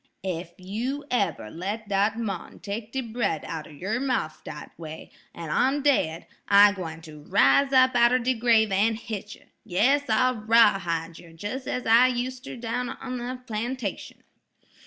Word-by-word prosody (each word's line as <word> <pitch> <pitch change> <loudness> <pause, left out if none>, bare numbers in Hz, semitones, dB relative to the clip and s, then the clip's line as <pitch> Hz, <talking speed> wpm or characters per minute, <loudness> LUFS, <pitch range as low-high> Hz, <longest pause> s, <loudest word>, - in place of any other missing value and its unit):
Ef 175 -2 -4
you 235 +10 -4
eber 175 - -1
let 205 +6 -5
dat 205 +2 +1
mon 200 -6 -5
take 210 +2 -6
de 265 - -2
bread 225 - -2
outer 155 -2 -6
yer 195 - -3
mouf 255 - -2
dat 150 - -9
way, 160 -1 -9 0.2
an 165 -2 -7
I'm 270 - +2
daid, 165 - +1 0.2
I 205 +1 +7
gwine 165 -5 -7
ter 155 -2 -11
riz 150 - +3
up 260 -1 +5
outer 240 +1 +5
de 255 +1 0
grave 225 -3 +3
an' 210 +4 +2
hit 215 -3 -7
yer; - - -22 0.2
yas, 250 +11 +2
I'll 255 +3 +2
rawhide 180 -7 +2
yer 170 - -14
jes' 255 +9 -5
as 250 - -3
I 230 +3 +6
user 255 +1 -4
down 240 +1 -3
on 255 -2 -6
de 250 +1 -5
plantation." 235 -1 -4
220 Hz, 160 wpm, -26 LUFS, 180-250 Hz, 0.2 s, I